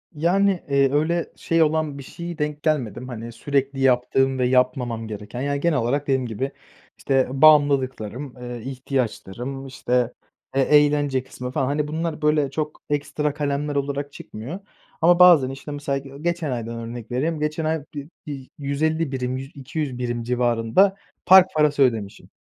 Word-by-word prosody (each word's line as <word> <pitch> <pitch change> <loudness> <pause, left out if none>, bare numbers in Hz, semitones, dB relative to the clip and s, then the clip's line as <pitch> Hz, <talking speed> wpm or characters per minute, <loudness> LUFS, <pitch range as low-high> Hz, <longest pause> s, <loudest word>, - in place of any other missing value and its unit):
Yani, 185 +4 +2
eee, 140 -1 +3
öyle 165 +3 0
şey 165 -1 +2
olan 155 -2 0
bir 140 - -8
şeye 170 +4 -7
denk 150 -1 -3
gelmedim, 125 -6 -1
hani, 115 -2 -7
sürekli 135 +3 -1
yaptığım 135 +1 +2
ve 125 - +2
yapmamam 125 -3 +1
gereken, 105 +3 -6
yani, 140 +1 -1
genel 170 -1 +2
olarak 130 +5 0
dediğim 130 -2 +1
gibi, 120 +4 -3 0.5
işte, 135 -1 +1
bağımlılıklarım, 135 -4 +3
eee, 120 -1 -7
ihtiyaçlarım, 130 0 -4
işte, 125 -2 0 0.4
e 135 - +2
eğlence 145 -2 +3
kısmı 125 -1 -7
falan, 130 - 0
hani, 145 +2 -1
bunlar, 160 +1 -3
böyle, 150 -2 +2
çok 155 +1 -4
ekstra 145 0 -1
kalemler 145 0 -2
olarak 140 0 -2
çıkmıyor 130 - -8 0.4
ama 175 +2 +5
bazen, 170 -8 +7
işte, 135 +2 -8
mesela 145 -1 -2
ge 135 0 -12
geçen 170 -3 -1
aydan 115 -1 -4
örnek 115 0 -7
vereyim, 150 +6 -1
geçen 150 +1 -2
ay 155 -2 -1
bir 145 -1 -6 0.2
bir 135 -3 -7
150 155 +2 0
birim, 130 -1 -2
yü 135 - -5
200 140 -1 -4
birim 120 -1 -2
civarında 120 - +2 0.3
park 190 -1 +8
parası 150 -2 +3
ödemişim. 110 -6 -1
140 Hz, 160 wpm, -23 LUFS, 125-150 Hz, 0.5 s, park